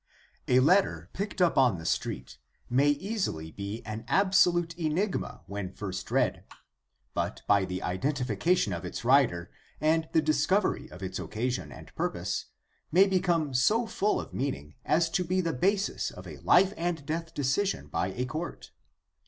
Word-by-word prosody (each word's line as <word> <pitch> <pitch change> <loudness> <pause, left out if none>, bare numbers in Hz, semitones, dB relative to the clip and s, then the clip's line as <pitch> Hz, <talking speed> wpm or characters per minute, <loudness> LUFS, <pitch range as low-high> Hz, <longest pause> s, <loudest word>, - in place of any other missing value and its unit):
A 125 - +5
letter, 185 +8 +3
picked 200 -2 -1
up 170 - +3
on 125 -8 +4
the 80 - -9
street, 65 -5 -3 0.3
may 135 +4 +4
easily 145 - -2
be 100 +5 -6
an 110 +1 -5
absolute 175 -3 +3
enigma 175 +4 -2
when 100 -2 -5
first 95 -2 -5
read, - - +1 0.7
but - - -3
by 100 -2 +4
the 90 0 -4
identification 125 - 0
of 85 - -5
its - - -6
writer 120 -10 +3 0.3
and 160 +1 +2
the 160 - +4
discovery 185 +6 +1
of 90 +2 -10
its 95 +1 -4
occasion 125 +4 -3
and - - -12
purpose - - -2 0.4
may 185 +5 +7
become 175 -6 +1
so 210 - +3
full 210 -1 0
of - - -8
meaning 100 - -3
as 165 +2 +3
to 180 - +1
be 185 +2 0
the 170 -3 0
basis 195 +8 0
of - - -11
a - - -8
life 190 +2 +4
and 165 -4 -2
death 165 +2 -3
decision 145 +8 0
by - - -1
a 120 +7 -3
court. 155 +6 -6
150 Hz, 160 wpm, -29 LUFS, -, 0.7 s, may